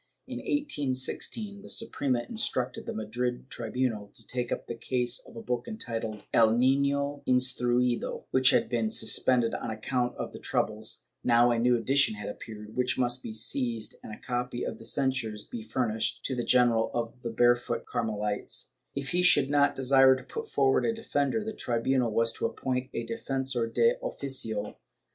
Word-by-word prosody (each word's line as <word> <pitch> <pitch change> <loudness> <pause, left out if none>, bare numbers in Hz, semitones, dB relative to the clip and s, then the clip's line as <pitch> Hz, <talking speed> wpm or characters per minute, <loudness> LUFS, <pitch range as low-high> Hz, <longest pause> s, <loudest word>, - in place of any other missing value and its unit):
In - - -6
1816 200 - -1
the - - -11
Suprema 130 - 0
instruc 130 - 0
ted - - -9
the - - -2
Madrid 120 +4 -3
tribunal 115 -3 -2
to 115 - -9
take 125 -1 -3
up - - -2
the - - -5
case 125 +1 0
of - - -14
a 115 - -7
book 125 - -2
entitled 115 - -4
"El 115 0 +5
Nino 140 +2 +2
instruido," 125 -1 +1
which 130 0 +5
had - - +3
been 115 -3 0
suspended 115 +2 +3
on - - -3
account 120 +3 -1
of - - -5
the - - -8
troubles; 110 +2 -2 0.2
now 120 0 +5
a 115 - +1
new 120 +1 +4
edition 135 +1 +3
had 105 - -6
appeared, 105 0 -9
which 125 0 +1
must 125 0 +1
be - - -6
seized 115 0 -1
and - - -9
a 105 - -7
copy 125 0 -3
of - - -4
the 115 - -11
censures 130 -7 -1
be 115 - -6
furnished 110 0 -2
to 130 - -1
the 120 - -1
General 120 -3 +3
of 120 +1 -3
the 120 - -3
Barefooted 120 0 +2
Carmelites; 105 -2 -2 0.2
if 140 0 -3
he 180 - +2
should 145 -6 +4
not 145 -1 +3
desire 135 0 +6
to 130 - -8
put - - -6
forward 135 -1 +3
a 230 - +1
defender, 210 -2 -1
the 220 - -3
tribunal 120 - 0
was 115 +1 +1
to - - -1
appoint 130 0 -3
a 115 - -2
defensor 125 0 -2
de 475 +2 +3
oficio. 125 - -2
125 Hz, 175 wpm, -29 LUFS, 115-135 Hz, 0.2 s, desire